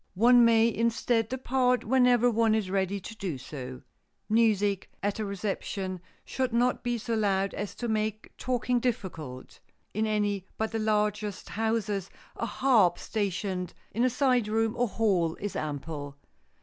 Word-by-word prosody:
One 240 +4 +6
may 230 -1 +5
instead 230 -1 +1
depart 255 -1 +1
whenever 245 0 +4
one 225 -1 +3
is 205 -4 -1
ready 195 0 0
to 220 - -8
do 185 -9 -4
so. 130 -1 -8 0.5
Music 205 -3 +2
at 205 +1 -1
a 215 - -1
reception 195 -2 -3 0.2
should 260 -1 -1
not 245 +2 +2
be 240 -1 -1
so 230 +1 -3
loud 195 -3 +1
as 205 -1 -5
to 240 - -4
make 215 -1 -2
talking 250 -1 0
difficult. 170 - -4 0.3
In 220 +2 0
any 205 -3 0
but 220 0 -1
the 225 - -2
largest 210 -1 -1
houses 215 -3 -1 0.3
a - - -3
harp 230 -10 +3
stationed 195 -3 -3 0.2
in 230 +3 0
a 255 - +4
side 250 -3 +2
room 225 +1 +1
or 245 0 +1
hall 190 -7 +1
is 205 0 -5
ample. 145 -1 -5
215 Hz, 150 wpm, -28 LUFS, 195-235 Hz, 0.5 s, One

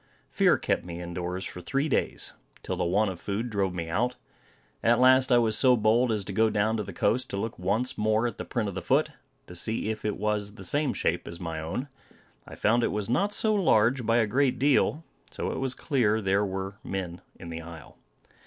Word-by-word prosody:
Fear - - +4
kept - - -1
me 85 -1 -7
in 85 0 -6
doors 90 +2 -3
for 90 - -7
three 135 - -1
days, 150 - -1 0.3
till - - -3
the - - -1
want 95 +4 +2
of 85 - -9
food 110 +4 -3
drove 100 -3 0
me 85 -2 -3
out. 120 +9 0 0.7
At 115 +1 +3
last 130 +1 +5
I 120 - +7
was 115 -2 +2
so 125 +1 +4
bold 115 +3 +3
as 105 -2 0
to 100 - -5
go 110 +3 +3
down 110 +1 +1
to 105 - -2
the - - -7
coast 130 +3 0
to 100 - -4
look 110 +3 -4
once 110 +8 -1
more 110 +2 +2
at 120 -2 -3
the - - -3
print 115 -3 -2
of 100 - -4
the 95 - -4
foot, - - +2 0.3
to - - -11
see 110 +5 -1
if 110 - -6
it 105 -1 -1
was 105 -1 -1
the - - -10
same 145 -3 0
shape - - -1
as 85 - -7
my 80 -3 -4
own. 105 - -4 0.6
I - - -9
found 115 +3 +2
it - - +3
was 105 +1 -2
not 200 +11 +2
so 215 +1 +1
large 125 - +3
by 115 +1 +2
a 115 - +4
great 130 +5 +1
deal; 145 +3 +2 0.3
so - - -4
it - - -4
was 130 -1 -1
clear 110 -7 +1
there 100 0 +1
were 95 +1 -5
men 90 -2 -4 0.2
in 85 - -8
the 85 0 -5
isle. 85 -1 -12
110 Hz, 230 wpm, -27 LUFS, 95-125 Hz, 0.7 s, I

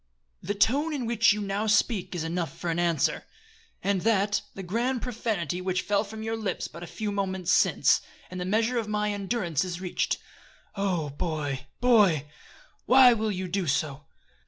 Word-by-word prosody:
"The 205 +3 -3
tone 285 +10 +2
in 260 -4 -3
which 230 +1 +4
you 210 - -1
now 200 +2 -2
speak 210 -3 +1
is 170 - -2
enough 170 0 -3
for 175 - -2
answer. 170 -1 0 0.6
Add 200 -1 +1
to - - -8
that 205 -1 +2
the 195 - -6
gross 235 +8 0
profanity 210 - -2
which 185 0 -1
fell 205 0 +1
from 220 +1 -8
your 225 0 -2
lips 215 -3 -3
but 170 - -11
a 175 - -7
few 215 +2 -4
moments 190 -3 -1
since, - - +4 0.3
and 180 0 -5
the - - -1
measure 225 +5 +1
of 220 - -4
my 210 0 0
endurance 195 - -1
is 180 -1 -4
reached. 180 -1 -1 0.6
Oh, 180 -7 -1
boy! 145 -3 -3
boy! 205 - +4 0.6
why 255 -1 +8
will 220 -1 -1
you 185 -1 -3
do 185 0 -2
so? 145 0 -1
200 Hz, 180 wpm, -27 LUFS, 175-220 Hz, 0.6 s, why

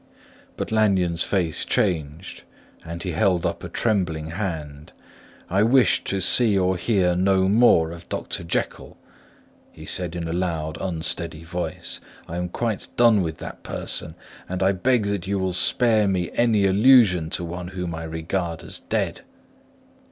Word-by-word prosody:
But - - -4
Lanyon's 95 -6 +2
face 90 -5 0
changed, 80 -2 -2 0.4
and 85 0 -7
he 90 - -3
held 90 0 +1
up - - -2
a - - -6
trembling 85 -8 -1
hand. 80 -6 -5 0.5
"I 95 +3 +1
wish 120 +3 +4
to 95 - -1
see 110 -2 +4
or 95 0 +2
hear 90 -1 +1
no 95 +1 +3
more 100 -6 +4
of 85 0 -11
Dr. - - -4
Jekyll," 85 - -3 0.7
he - - -12
said 90 -2 -2
in 85 -1 -4
a 80 - -3
loud, 80 -3 -2
unsteady 80 -3 -2
voice. 85 +1 -4 0.3
"I 85 - -5
am 90 0 -3
quite 110 +1 -3
done 115 -4 +5
with 80 -3 -3
that - - -8
person; 80 - -4 0.3
and 95 +1 -2
I 95 - +4
beg 115 +4 +1
that 100 -3 -2
you 100 0 0
will 95 -1 -1
spare 110 +2 +3
me 90 -3 -1
any 110 -4 +3
allusion 100 -5 +5
to - - -6
one 90 +1 -5
whom 90 -2 -5
I 80 0 -5
regard 85 +1 -3
as - - -7
dead." - - -2
90 Hz, 160 wpm, -23 LUFS, 85-100 Hz, 0.7 s, done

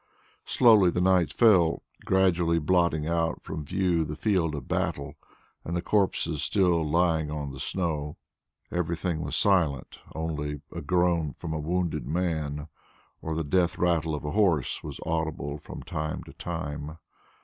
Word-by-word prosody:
Slowly 110 -7 +6
the 90 - -1
night 90 -2 +3
fell, 95 -8 +4 0.2
gradually 90 -3 +3
blotting 85 -1 +2
out 85 0 -1
from 80 -1 -5
view 90 +1 +1
the 75 0 -5
field 85 -5 +1
of 70 - -7
battle, 70 +1 -2 0.5
and 85 +1 -3
the - - -1
corpses 95 -8 +1
still 90 -1 +2
lying 80 -2 +2
on 75 -2 -4
the 65 - -9
snow. 75 -3 -2 0.5
Everything 85 -1 -1
was 75 -2 -3
silent; 80 -10 +1 0.2
only 75 -3 -3
a 85 - -5
groan 85 -2 +1
from 80 - -6
a 80 - -2
wounded 85 -4 -1
man 75 -3 -2 0.5
or 80 0 -3
the 80 - -1
death 85 +3 +1
rattle 80 -3 +1
of 75 - -6
a 75 - -2
horse 90 - +1
was - - -7
audible 80 -3 -2
from - - -9
time 75 0 -4
to - - -13
time. 75 -2 -5
80 Hz, 150 wpm, -27 LUFS, 75-90 Hz, 0.5 s, Slowly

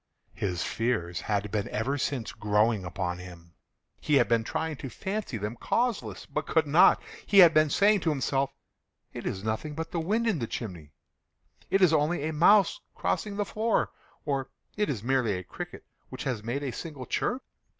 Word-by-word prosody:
His 90 -3 -2
fears 105 -8 -1
had 105 -1 -1
been 105 -2 -1
ever 130 +6 -1
since 135 -4 -2
growing 105 -1 +1
upon 90 0 -3
him. 85 -2 -12 0.5
He 150 - +1
had 125 -3 +5
been 115 -1 +2
trying 160 +4 -3
to 135 - -6
fancy 190 - -4
them 105 +3 -4
causeless, 235 - -1
but - - -4
could - - +3
not. - - +6 0.3
He 200 - +2
had 175 -4 +9
been 155 -1 +4
saying 205 +6 +4
to 170 - 0
himself—"It 135 -1 -4
is 95 - -3
nothing 110 +8 -3
but 165 +1 -5
the 170 - -1
wind 215 +8 0
in 215 -9 +1
the 115 - -2
chimney—it 90 - -6
is 170 -3 +5
only 155 +1 +2
a 160 - -2
mouse 200 - +5 0.2
crossing 205 -2 -1
the 205 - 0
floor," 220 +2 0 0.3
or 135 -3 -1 0.3
"It 210 -3 0
is 115 -8 -3
merely 125 -4 +1
a 90 - -6
cricket - - -8 0.2
which - - -6
has 125 -5 -2
made 125 +6 -2
a 135 - -2
single 140 0 -7
chirp." 250 - -1
135 Hz, 180 wpm, -28 LUFS, 105-165 Hz, 0.5 s, had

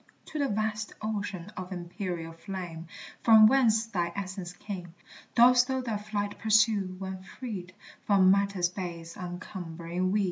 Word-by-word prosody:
To 310 - -3
the 280 - +2
vast 215 0 -2
ocean 205 -3 -4
of 185 -2 -6
empyreal 175 -2 -5
flame, 175 -3 -6 0.3
From 220 -2 +8
whence 225 -2 +4
thy 175 -6 -1
essence 190 -2 -5
came, 180 -2 -8 0.4
Dost 245 +1 +7
thou 260 -1 0
thy 230 -4 -2
flight 205 -1 -3
pursue, 210 -3 +3
when 190 0 -5
freed 190 -4 -7 0.3
From 190 -2 +6
matter's 200 -2 +2
base 170 -2 -6
uncumbering 175 -1 -4
weed? 210 - +2
195 Hz, 140 wpm, -29 LUFS, 180-215 Hz, 0.4 s, From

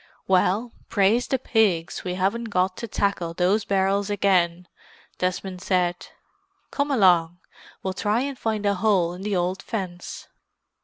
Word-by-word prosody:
"Well, 190 +5 +2 0.2
praise 215 +4 +2
the 265 - +1
pigs 210 -9 +1
we 180 -1 -3
haven't 200 +6 0
got 185 -3 0
to 230 - -5
tackle 195 -5 -1
those 190 +4 +2
barrels 195 +1 +1
again!" 180 -3 +1 0.5
Desmond 185 0 -2
said. 180 -2 0 0.6
"Come 285 0 -1
along—we'll 180 - 0
try 210 +5 0
and 280 0 -3
find 220 -4 -2
a 200 - +3
hole 190 -4 +2
in 180 - -9
the 205 0 -1
old 180 +2 -1
fence." 185 -5 -6
190 Hz, 140 wpm, -24 LUFS, 180-210 Hz, 0.6 s, a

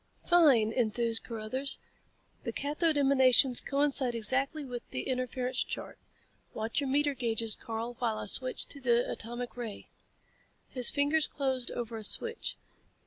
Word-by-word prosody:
"Fine," 280 -11 +5
enthused 230 -1 +1
Carruthers, 235 +4 -2 0.7
"The - - -3
cathode 300 +2 0
emanations 265 -2 +4
coincide 275 -3 +2
exactly 270 +6 +1
with 245 -2 -5
the - - -4
interference 255 0 -2
chart. - - -7 0.6
Watch 225 +5 -1
your 275 - -2
meter 290 +1 +2
gauges, 225 -4 0
Karl, 230 0 -5
while 225 -3 0
I - - -4
switch 255 +5 -1
to 280 - -6
the 240 -1 +2
atomic 240 +2 -5
ray." 235 -4 -7 0.8
His 250 -2 +2
fingers 290 +2 +2
closed 260 -3 -2
over 235 -1 -5
a 220 - -7
switch. 460 - 0
255 Hz, 140 wpm, -30 LUFS, 230-280 Hz, 0.8 s, Fine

